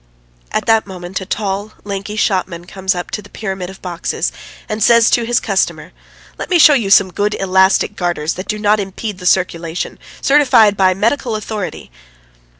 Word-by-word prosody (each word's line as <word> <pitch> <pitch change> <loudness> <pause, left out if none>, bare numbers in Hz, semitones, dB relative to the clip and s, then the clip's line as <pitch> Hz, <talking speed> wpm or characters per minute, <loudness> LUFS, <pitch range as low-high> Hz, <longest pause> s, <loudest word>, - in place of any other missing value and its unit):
At - - -1
that 225 -2 +3
moment 180 0 -6
a 190 - -8
tall, 205 0 -3
lanky 200 +1 -5
shopman 185 -5 -1
comes 190 0 -2
up 175 - -5
to 210 - -3
the 205 - -16
pyramid 190 -4 -5
of 190 - -13
boxes, 175 -2 -3 0.4
and 215 +1 -4
says 230 +2 +5
to 235 -2 +2
his 240 0 +2
customer: 195 -2 -1 0.5
"Let - - -5
me 360 - +4
show 310 -2 +7
you 230 -8 +1
some 190 -2 +5
good 205 +1 0
elastic 190 +2 +2
garters 175 -4 -1
that 185 - -7
do 215 - -2
not 210 0 +2
impede 200 +1 -5
the 180 - -3
circulation, 170 -2 -1 0.2
certified 255 -7 +4
by 185 -1 +3
medical 230 +3 0
authority 210 - -5
195 Hz, 175 wpm, -16 LUFS, 185-215 Hz, 0.5 s, show